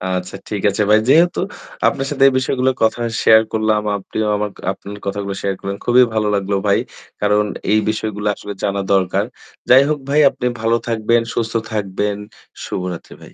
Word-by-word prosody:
আচ্ছা, 90 +1 -5
ঠিক 105 -2 -3
আছে 105 +2 0
ভাই। 110 +1 +6
যেহেতু 170 +4 +4 0.5
আপনার 135 - 0
সাথে 135 -2 +1
এই 135 - +3
বিষয়গুলো 130 0 +1
কথা 115 +2 +1 0.2
শেয়ার 110 0 +7
করলাম। 110 -1 +1 0.2
আপনিও 105 +2 -3
আমার 105 0 -2 0.2
আপনার 100 +1 -10
কথাগুলো 100 0 -3
শেয়ার 100 -1 -1
করলেন। 100 0 -5
খুবই 125 +1 +6
ভালো 105 -1 0
লাগলো 100 0 -1
ভাই। - - +3 0.4
কারণ 105 0 +2 0.3
এই 110 - +4
বিষয়গুলো 110 -1 -3
আসলে 100 0 -7
জানা 100 0 0
দরকার। 95 -2 +1 0.4
যাই 130 +2 +8
হোক 150 -1 0
ভাই 150 +2 +3
আপনি 125 - -6 0.2
ভালো 115 +1 +2
থাকবেন, 115 +1 +2
সুস্থ 115 0 -2 0.2
থাকবেন। 105 0 -2 0.5
শুভরাত্রি 90 -2 -5
ভাই। - - -14
105 Hz, 170 wpm, -18 LUFS, 100-115 Hz, 0.5 s, যাই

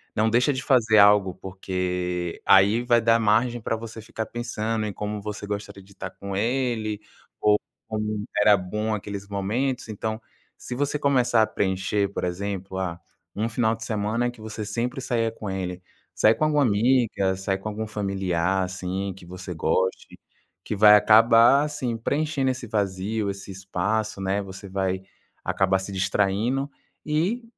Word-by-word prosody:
Não 110 +1 +2
deixa 125 +5 +3
de 130 - -3
fazer 115 -5 +4
algo 100 -2 +6
porque 90 -2 -3
aí 100 +5 +5
vai 120 -1 +3
dar 115 +1 +4
margem 115 +3 +2
pra 115 - -2
você 115 0 -8
ficar 110 0 -5
pensando 110 -2 -3
em 105 - -4
como 105 0 -4
você 105 0 -6
gostaria 100 -1 -5
de 100 +1 -19
tá 95 - -5
com 100 -1 -7
ele 115 -2 -1 0.4
ou 105 0 +5 0.3
como 105 -1 -2
era 105 0 +6
bom 105 +4 -2
aqueles 100 -1 -5
momentos. 115 +7 -2
Então, 110 +1 -4 0.3
se 125 - -7
você 145 +2 -1
começar 125 -5 +3
a 110 - +3
preencher, 95 +1 0
por - - -3
exemplo, 95 +1 -4
ah, 90 -2 -3 0.4
um 110 +3 -1
final 110 0 +1
de 115 - -9
semana 110 +2 -1
que 120 - -12
você 110 0 -6
sempre 120 +6 -3
saia 115 -3 0
com 105 -3 -7
ele, 90 -1 -4 0.3
sai 110 +1 +4
com - - -2
alguma 150 -1 +2
amiga, 110 -4 +2
sai 95 0 -2
com 95 +3 -8
algum 110 +1 -4
familiar, 95 -3 -1
assim, 95 +1 -4
que 90 - -13
você 90 +1 -8
goste, 95 +4 -1 0.4
que - - -3
vai 105 +1 +8
acabar, 115 +5 +6
assim, 135 -6 -3
preenchendo 140 +2 0
esse 130 -2 -6
vazio, 100 0 -1
esse 100 0 -10
espaço, 100 +2 -2
né, 95 +1 0
você 95 +1 -10
vai 95 -1 -1 0.4
acabar 95 0 +1
se 95 +1 -6
distraindo 105 +8 0 0.3
e 175 +11 0
105 Hz, 165 wpm, -25 LUFS, 95-115 Hz, 0.4 s, vai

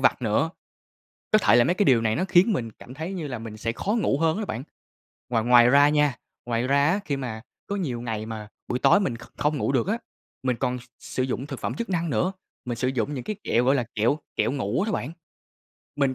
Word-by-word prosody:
vặt - - +3
nữa. - - +1 0.8
Có 215 - +7
thể 190 - +4
là 120 - +6
mấy 175 - +2
cái 200 +1 +1
điều 125 -4 +5
này 110 -1 +1
nó 185 - 0
khiến 190 +4 +4
mình 115 -9 -2
cảm 120 - -13
thấy 160 +7 -5
như 165 -5 -4
là 125 -4 -5
mình 115 -1 -8
sẽ 115 +1 -2
khó 195 - -3
ngủ 215 -11 +1
hơn 165 +3 +2
á 215 - -2
bạn. 120 - -4 0.7
Ngoài 115 -2 +1
ngoài 120 0 +6
ra 145 +2 +6
nha 150 -3 +2 0.3
ngoài 120 +1 -1
ra 140 +1 +3
á, 195 +4 +2
khi 140 -2 -1
mà 115 -4 -5 0.3
có 200 - -2
nhiều 135 -12 -2
ngày 110 -3 -3
mà 110 -1 -6 0.2
buổi 125 - -1
tối 200 - +5
mình 150 - -1
kh - - -12
không 150 +1 +1
ngủ 135 - 0
được 135 +5 +1
á, 220 - +1 0.5
mình 125 -2 +1
còn 125 +1 -1
s - - -14 0.2
sử 130 - -3
dụng 130 +1 -2
thực 135 -4 -6
phẩm - - -2
chức 235 -2 -4
năng 170 -3 0
nữa, 180 +6 +1 0.3
mình 120 -2 -3
sử 125 - 0
dụng 130 +2 -1
những 130 - -4
cái 215 - -3
kẹo, 120 +1 +2
gọi 135 +2 +4
là, 125 - +1
kẹo 120 +8 +2 0.2
kẹo - - +1
ngủ 125 - -1
á 220 +1 -1
bạn. 145 -5 -2 0.9
Mình 140 -2 +2
135 Hz, 255 wpm, -25 LUFS, 120-165 Hz, 0.9 s, Có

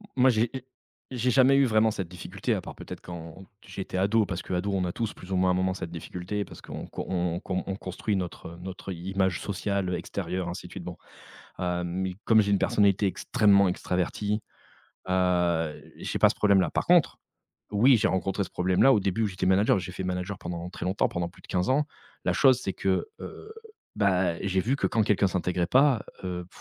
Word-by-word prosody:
Moi 130 0 +5
j'ai 115 -1 +2
j 130 - -3 0.5
j'ai 125 -1 0
jamais 130 +1 +5
eu 140 - +5
vraiment 110 -2 +3
cette 95 -5 -4
difficulté 90 -1 -3
à - - 0
part - - -9
peut-être - - -8
quand 85 +2 -9 0.2
j'étais 95 -1 -6
ado, 105 +3 +3
parce 95 -2 -4
qu'ado 90 +2 -2
on 95 -1 +1
a 90 - -1
tous 115 +3 -3
plus 90 - -12
ou 95 - +1
moins 90 0 +3
à - - +2
un - - +1
moment 95 0 +1
cette 90 -2 -6
difficulté, 90 +4 -4
parce - - -12
qu'on - - -7
qu'o - - -6
on 90 -2 -1
on - - -3
qu'on 95 0 -3
on 95 - -3
construit 95 +2 -3
notre, 90 -3 -4
heu, 85 - -11
notre, 95 +1 -7
heu, - - -4
i 90 +3 -6
image 95 -2 +1
sociale, 100 -1 -2
heu, 90 - 0
extérieure 90 0 -3
ainsi 85 - -6
de - - -16
suite - - -7
bon. - - -7 0.6
Hem, 90 -1 -1
mais 95 +1 -2
comme 110 -1 +5
j'ai 100 0 0
une 100 - +4
personnalité 100 +1 +3
extrêmement 100 0 +3
extravertie, 95 +4 -1 0.7
heu, 90 -4 +1
j'ai - - -3
pas - - +6
ce - - -2
problème 100 -2 +4
là. 90 -4 +1
Par - - -1
contre, 175 -3 +4 0.5
oui 120 +6 +6
j'ai 110 - +2
rencontré 95 +2 0
ce 90 - -11
problème 90 0 +1
là 135 - +7
au 110 - +4
début 95 +3 0
où - - +3
j'étais 95 -2 -2
manager, 95 +2 +4
j'ai 90 - -7
fait 95 - -5
manager 90 +2 -3
pendant 85 0 -5
très - - -7
longtemps, 95 +3 +1
pendant 85 -1 -2
plus 85 - -19
de - - -17
15 90 0 0
ans. 145 +3 +3 0.4
La - - +2
chose 130 -3 +5
c'est 95 - -2
que, 95 -2 0
heu, 435 - -9 0.4
ben 90 -4 +2
et - - -3
j'ai 95 0 +2
vu 125 +8 0
que - - 0
quand 115 - +2
quelqu'un 100 -1 +3
s'intégrait 90 -1 0
pas, 130 +3 +4 0.2
heu, 90 -1 -4
95 Hz, 230 wpm, -27 LUFS, 90-105 Hz, 0.7 s, là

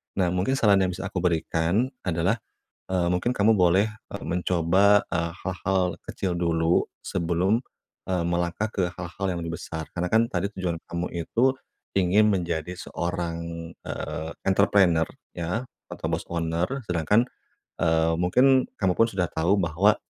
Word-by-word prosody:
Nah, 90 -3 +1
mungkin 90 +9 +1
saran 105 -6 +4
yang 95 -1 +1
bisa 90 - -5
aku 90 - -3
berikan 85 +6 +1
adalah, 90 +5 +1 0.5
eee, 90 -2 +1
mungkin 90 +7 +1
kamu 110 -2 +3
boleh, 95 +2 +4 0.2
e - - -5
mencoba, 90 +4 +3
e - - -1 0.3
hal-hal 95 -1 0
kecil 90 -3 -3
dulu, 85 -1 +2 0.2
sebelum, 90 +6 0 0.5
e - - +1
melangkah 85 +4 0
ke 100 -3 -1
hal-hal 90 +2 -5
yang 90 - -3
lebih 85 0 -4
besar, 80 -2 -6
karena 90 0 -1
kan 115 +1 +4
tadi 100 -1 -2
tujuan 90 -3 -1
kamu 85 +1 -2 0.2
itu, 130 +8 +2 0.4
ingin 100 +3 +4
menjadi 90 -3 -1
seorang, 85 -2 -4
eee, 80 +1 -4
entrepreneu 95 -4 +4 0.3
ya, 90 +7 -2 0.3
atau - - -7
bos - - -2
owner, 85 +1 -1 0.2
sedangkan, 90 +7 +3 0.6
eee, 80 0 +3
mungkin 125 +10 +4
kamu 95 -3 +2
pun 115 +4 +3
sudah 95 -2 0
tahu 85 +6 +1
bahwa 95 +4 +3
90 Hz, 145 wpm, -26 LUFS, 85-100 Hz, 0.6 s, saran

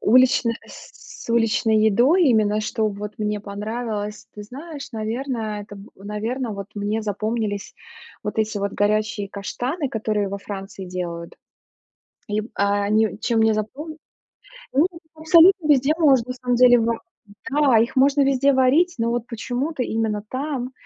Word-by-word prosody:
Уличная, 245 0 +4
с - - -13
уличной 225 -1 +2
едой, 265 - +4
именно 215 -4 +3
что 215 0 -1
вот 210 +1 -7
мне 210 -1 -2
понравилось? 210 +1 -5
Ты 210 - -8
знаешь, 280 +3 -9
наверно, 220 -1 -3
это 205 0 -11
б 200 +2 -13
наверно, 215 +5 -4
вот 200 -1 -6
мне 210 +2 -1
запомнились 215 0 -3 0.5
вот 210 - -4
эти 220 -1 0
вот 200 0 -2
горячие 210 0 0
каштаны, 250 - -3
которые 215 -3 -1
во 200 - -4
Франции 195 -1 -7
делают. 175 -2 -5 0.9
Им, 215 +2 -2
а, 200 0 +1
они 215 +1 +1
чем 230 -2 +1
мне 220 0 +4
запом 290 +9 -5 0.8
ну, 290 +6 +4 0.3
абсолютно 330 +2 +5
везде 285 +1 +4
можно 270 -8 +4
на - - -2
самом 250 -1 -1
деле 245 -1 +7
ва 230 0 0 0.5
да, 275 -5 +4
их 235 +4 0
можно 280 +2 +4
везде 275 +1 +3
варить. 285 +8 +3
Но 230 0 +1
вот 240 -1 -2
почему-то 250 +5 -3
именно 220 -3 -2
там, 260 -2 -3
225 Hz, 145 wpm, -22 LUFS, 210-260 Hz, 0.9 s, деле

